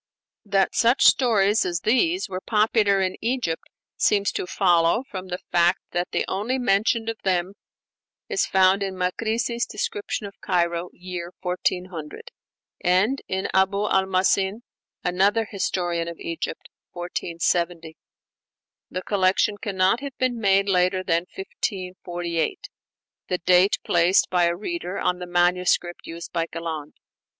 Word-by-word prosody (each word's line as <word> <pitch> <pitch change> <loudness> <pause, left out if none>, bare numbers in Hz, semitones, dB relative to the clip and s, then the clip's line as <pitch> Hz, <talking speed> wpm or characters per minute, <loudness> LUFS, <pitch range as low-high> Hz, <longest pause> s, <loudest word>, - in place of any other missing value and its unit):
That 195 -1 +1
such 240 +3 +3
stories 215 -5 +4
as 175 -1 -2
these 325 - +2
were 185 -1 -5
popular 210 -2 +2
in 185 0 -2
Egypt 230 -8 -1 0.3
seems 200 -1 +2
to - - -4
follow 175 +4 +3
from 185 -1 -6
the 180 -1 -3
fact 175 +1 +4
that 175 0 -1
the - - -1
only 225 +7 -1
mention 225 0 +1
of 225 -1 -4
them 185 0 0 0.7
is 415 -4 0
found 190 +1 +4
in 195 -1 -2
Makrisi's 225 +6 -1
'Description 420 - -3
of 200 - -11
Cairo' 175 -2 0 0.5
(1400) 180 - -3 0.5
and 195 +9 +2
in 190 +1 -2
Abu 200 +2 +2
al 190 -1 +2
Mahasin, 190 +3 +1 0.4
another 200 +5 +2
historian 175 -4 -2
of 170 -1 -6
Egypt 165 -1 -5 0.3
(1470). 170 -1 -2 0.9
The 185 - -4
collection 200 +1 +1
cannot 195 +1 +1
have 280 -2 -7
been 255 -2 0
made 195 -1 +3
later 185 0 +2
than 170 0 0
1548, 180 - -4 0.6
the 180 - 0
date 180 +2 +4
placed 175 +2 +3
by 180 -1 +3
a 170 0 +1
reader 215 - -4
on 180 0 0
the 180 - -6
manuscript 175 0 +1
used 165 +1 -8
by 165 0 0
Galland. 160 -3 -6
190 Hz, 130 wpm, -24 LUFS, 175-210 Hz, 0.9 s, stories